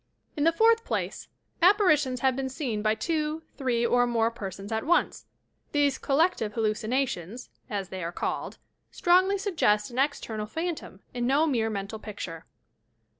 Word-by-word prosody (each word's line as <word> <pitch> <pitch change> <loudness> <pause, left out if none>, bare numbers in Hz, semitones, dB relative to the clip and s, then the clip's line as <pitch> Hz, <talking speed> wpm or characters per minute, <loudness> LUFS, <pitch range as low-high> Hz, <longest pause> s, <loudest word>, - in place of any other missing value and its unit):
In 295 - 0
the 330 - +6
fourth 455 +6 +4
place, - - -3 0.3
apparitions 310 - +4
have 265 -1 +3
been 265 0 -2
seen 255 -5 -3
by 215 0 +2
two, 310 +2 -2
three 245 -4 0
or 245 +1 +3
more 230 -1 +1
persons 195 -2 -7
at 220 0 -1
once. 345 +3 +1 0.5
These 290 -2 +2
"collective 280 - +1
hallucinations," 220 -1 -2 0.2
as 200 -4 -3
they 185 -2 -5
are 170 - -3
called, - - -3 0.3
strongly 370 +3 +3
suggest 310 - +1
an 245 - -4
external 225 -6 -1
phantom 320 - -5
and 240 -1 -1
no 285 +4 +3
mere 235 -7 +1
mental 205 +1 -4
picture. 210 -1 -7
255 Hz, 150 wpm, -27 LUFS, 215-310 Hz, 0.5 s, the